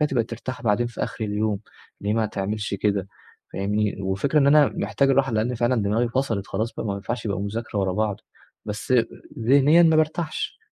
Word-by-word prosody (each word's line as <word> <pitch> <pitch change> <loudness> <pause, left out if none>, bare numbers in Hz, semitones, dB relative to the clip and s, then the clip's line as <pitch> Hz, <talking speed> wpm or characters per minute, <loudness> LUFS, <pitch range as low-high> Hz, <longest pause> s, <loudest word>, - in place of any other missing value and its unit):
كده 150 - +4
تبقى 120 -5 +1
ترتاح 120 +3 -7
بعدين 115 +2 +2
في 120 - -5
آخر 110 - -5
اليوم، 105 0 -1 0.4
ليه 105 +1 0
ما 110 -1 +1
تعملش 105 +1 -3
كده 100 -1 0 0.4
فاهمني 105 0 -1
وفكرة 100 +11 +1
إن 140 - +4
أنا 145 0 +6
محتاج 135 -1 +1
الراحة 135 -2 +2
لأن 115 +3 0
فعلًا 120 -1 +1
دماغي 110 +4 +1
فصلت 115 -5 -1
خلاص 110 +4 -3
ما 100 -2 -2
ينفعش 110 +4 -4
يبقى 100 -4 -1
مذاكرة 105 +1 -3
ورا 95 -2 +1
بعض 105 0 0 0.5
بس 105 +4 -2 0.4
ذهنيًا 140 +8 +5
ما 160 -2 +5
بارتاحش. 155 - -1
110 Hz, 180 wpm, -24 LUFS, 100-130 Hz, 0.5 s, أنا